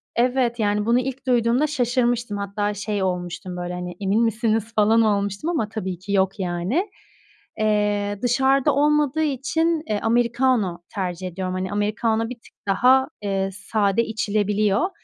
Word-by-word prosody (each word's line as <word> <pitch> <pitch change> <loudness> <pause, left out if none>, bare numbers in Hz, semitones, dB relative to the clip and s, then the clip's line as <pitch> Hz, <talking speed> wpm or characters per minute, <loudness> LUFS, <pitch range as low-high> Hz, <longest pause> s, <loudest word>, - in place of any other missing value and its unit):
Evet, 245 0 +1
yani, 205 0 +1
bunu 235 +2 +3
ilk 265 +1 -5
duyduğumda 245 +4 +3
şaşırmıştım. 240 -5 0
Hatta 205 +1 -2
şey 205 -1 -2
olmuştum, 180 0 -3
böyle, 175 0 -4
hani, 180 0 -5
"Emin 205 +4 +1
misiniz?" 225 0 0
falan 220 +2 +4
olmuştum 205 - 0
ama 285 -11 -1
tabii 190 -5 -4
ki 200 +2 -7
yok, 195 +1 +1
yani. 185 - -1 0.7
Eee, 205 -1 +1
dışarıda 265 +2 +2
olmadığı 300 +1 +2
için, 310 +3 0
eee, 210 -1 0
americano 235 -5 +1
tercih 185 -1 -3
ediyorum. 185 +1 -4
Hani, 185 +1 -3
americano 220 +2 0
bir 250 - -5
tık 235 - -21
daha, 255 +6 +4
eee, 195 -1 -1
sade 200 +2 0
içilebiliyor 210 - 0
215 Hz, 145 wpm, -23 LUFS, 195-245 Hz, 0.7 s, falan